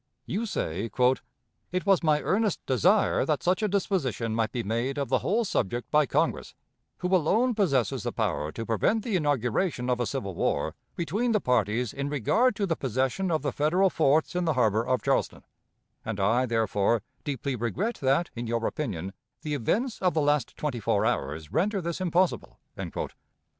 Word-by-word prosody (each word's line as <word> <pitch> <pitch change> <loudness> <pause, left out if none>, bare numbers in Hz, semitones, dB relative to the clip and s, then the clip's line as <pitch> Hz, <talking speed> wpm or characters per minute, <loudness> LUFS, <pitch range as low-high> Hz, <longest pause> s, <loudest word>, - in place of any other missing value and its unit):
You 220 +5 -2
say, 100 - -2 0.8
"It 185 +1 -2
was 195 -2 +4
my 155 -3 +2
earnest 210 -1 +1
desire 180 - +3
that 150 -4 -1
such 185 +4 +2
a 215 - +2
disposition 170 - -1
might 110 -1 0
be 120 - -2
made 120 +6 -1
of 140 -1 -2
the - - +3
whole 225 +5 +1
subject 120 - -2
by 150 -2 +4
Congress, - - -1 0.4
who 180 +1 +1
alone 215 +9 +2
possesses 140 - +1
the - - -3
power 75 +1 -1
to 115 - -5
prevent 115 - +1
the 225 -5 -1
inauguration 140 - 0
of 125 - 0
a 120 - 0
civil 105 -9 -3
war - - 0 0.2
between 205 - 0
the 215 - +3
parties 120 - 0
in 140 +1 -3
regard 210 - +2
to 200 - 0
the 165 -4 0
possession 135 - -1
of 155 -4 0
the 140 - 0
Federal 175 +8 +2
forts 155 +2 +2
in 180 0 0
the 160 - +2
harbor 110 -4 +2
of 130 +1 0
Charleston; - - 0 0.6
and 110 -2 -4
I, 115 +6 +2
therefore, 110 -1 +1 0.2
deeply 140 -1 -2
regret 155 - -2
that, 140 +6 +2
in 120 0 -4
your 115 0 -1
opinion, 95 - -3 0.3
'the 150 -2 -2
events 215 - -1
of 180 -3 +2
the 155 - +3
last 145 -3 +1
twenty 140 -6 -2
four 105 - +1
hours 75 +3 -2
render 195 +5 +1
this 170 0 -4
impossible.'" 180 0 0
145 Hz, 180 wpm, -27 LUFS, 115-185 Hz, 0.8 s, was